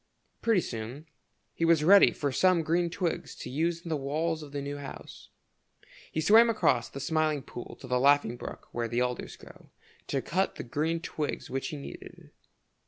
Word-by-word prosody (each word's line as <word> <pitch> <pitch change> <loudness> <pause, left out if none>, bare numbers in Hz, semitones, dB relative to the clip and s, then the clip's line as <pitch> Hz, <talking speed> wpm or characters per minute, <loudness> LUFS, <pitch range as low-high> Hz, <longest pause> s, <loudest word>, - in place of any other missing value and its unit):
Pretty 225 -5 +3
soon 120 +5 -6 0.5
he - - -3
was 165 -2 +4
ready 195 +4 +8
for 145 -2 -2
some 180 +4 +3
green 170 +2 +1
twigs 170 0 -3
to 125 - -8
use 165 +4 0
in 170 - -7
the 160 - 0
walls 155 +3 -1
of 150 -2 -10
the 145 - -3
new 140 +1 -4
house. 140 -1 -10 0.8
He - - -2
swam 225 +8 +7
across 225 - +2
the 140 - -8
Smiling 155 0 0
Pool 120 - -9
to - - -10
the 125 0 +1
Laughing 140 -3 +4
Brook, - - -9
where 120 -1 -2
the 120 +2 -1
alders 125 -1 -4
grow, - - -16 0.4
to - - -1
cut - - 0
the - - -6
green 160 +7 -1
twigs 150 -6 -4
which 135 +1 -2
he 150 - -5
needed. 140 - -11
150 Hz, 185 wpm, -29 LUFS, 135-165 Hz, 0.8 s, ready